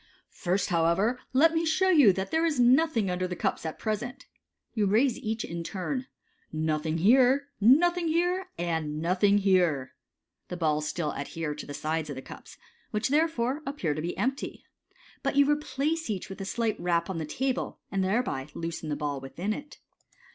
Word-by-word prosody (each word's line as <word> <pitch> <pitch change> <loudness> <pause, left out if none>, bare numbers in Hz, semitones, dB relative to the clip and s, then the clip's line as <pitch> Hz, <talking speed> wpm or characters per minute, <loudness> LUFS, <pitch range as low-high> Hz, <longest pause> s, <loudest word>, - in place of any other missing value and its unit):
First, 185 +1 -1
however, 175 +8 +2
let 320 +5 +5
me 325 0 +1
show 370 +4 +2
you 290 - +7
that 190 +5 -4
there 320 0 +2
is 315 -5 +1
nothing 245 - +4
under 185 0 -1
the 180 - -4
cups 165 - -2
at 160 - -5
present." 240 +5 -4 0.5
You 215 -4 +1
raise 230 +5 +3
each 220 0 -3
in 170 0 -5
turn 230 - -4 0.2
— - - -42
* - - -43
Nothing 155 0 -1
here, 255 - +4
nothing 340 - +5
here, 355 +3 0
and 160 -3 -2
nothing 185 +5 +3
here!'* 175 -10 +2 0.5
The 180 - -5
balls 155 -2 0
still 155 -1 -2
adhere 150 +2 -4
tc 150 - -8
lAe 145 - -6
sides 155 +1 -2
of 145 - -4
the 130 - -7
cups, - - -12 0.3
which, 215 +4 -1
therefore, 290 -3 +1
appear 270 - -2
to 155 - -4
be 170 +2 -4
empty, 260 +7 -3 0.6
but - - -1
you 280 0 +5
replace 295 +1 -1
each 195 -4 -3
with 195 +1 -7
a - - -4
slight 225 +1 -1
rap 170 -1 +1
on 185 -3 -3
the 160 - -3
table, 265 - -2
and 195 -1 0
thereby 185 - -1
loosen 165 -1 -4
the 150 - -1
ball 145 -2 -3
within 175 +10 -3
it. 290 +5 -9
200 Hz, 185 wpm, -28 LUFS, 165-270 Hz, 0.6 s, you